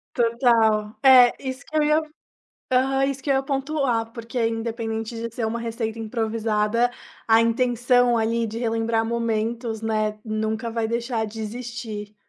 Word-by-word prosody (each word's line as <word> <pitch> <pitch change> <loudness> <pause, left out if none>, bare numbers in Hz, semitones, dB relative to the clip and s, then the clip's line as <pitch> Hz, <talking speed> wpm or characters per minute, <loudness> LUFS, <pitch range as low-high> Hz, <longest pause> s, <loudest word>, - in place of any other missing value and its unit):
Total. 230 -3 +2
É, 255 -2 +8
isso 260 +1 -5
que 310 - -3
eu 300 - +4
ia 305 +1 +3 0.7
aham, 270 +1 +2
isso 275 -1 -3
que 285 - -2
eu - - +4
ia 270 - +2
pontuar, 270 -5 -1
porque 230 0 -3
independente 225 0 -3
de 230 0 -5
ser 225 -2 -1
uma 230 +1 -2
receita 230 -1 -4
improvisada, 225 0 0 0.4
a 225 0 +5
intenção, 245 +1 +2
ali, 230 +1 0
de 225 +2 -5
relembrar 225 -1 0
momentos, 230 0 -2
né, 215 -1 -1
nunca 220 +1 -2
vai 225 -1 -1
deixar 235 -1 -2
de 220 +1 -8
existir. 220 -2 -6
230 Hz, 150 wpm, -23 LUFS, 220-245 Hz, 0.7 s, É